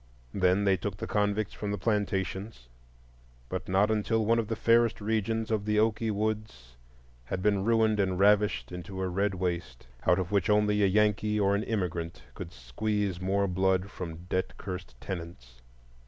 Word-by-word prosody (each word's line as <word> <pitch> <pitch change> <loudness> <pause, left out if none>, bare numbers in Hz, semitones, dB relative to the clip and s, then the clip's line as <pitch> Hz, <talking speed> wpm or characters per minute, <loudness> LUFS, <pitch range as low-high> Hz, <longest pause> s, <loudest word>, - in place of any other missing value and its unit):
Then 95 +1 +3
they 95 -1 +3
took 95 +1 -4
the - - -4
convicts 105 0 0
from 105 - -4
the 105 - -1
plantations, 100 - -2 0.8
but 95 0 -4
not 100 +3 +3
until 110 +1 +1
one 115 +2 +3
of 110 - -1
the 115 - -2
fairest 115 +1 +3
regions 110 +1 -1
of 110 -2 +1
the 105 0 +1
"Oakey 110 +1 +2
Woods" 105 - -3 0.5
had 90 +8 -4
been 100 -2 +2
ruined 110 -1 +3
and 95 -2 +1
ravished 105 0 +3
into 90 +2 -7
a 95 - -1
red 95 +2 0
waste, 85 -8 -3 0.2
out 90 - +5
of 95 0 -2
which 100 -2 +1
only 105 0 +3
a 100 - +5
Yankee 105 +1 +2
or 100 -1 +3
an 100 - +1
immigrant 90 -7 -3
could - - -7
squeeze 95 - -2
more 100 +1 +1
blood 95 +1 +1
from 85 -1 -7
debt 95 0 -2
cursed 90 -11 -7
tenants. 80 -10 -8
100 Hz, 170 wpm, -29 LUFS, 90-105 Hz, 0.8 s, out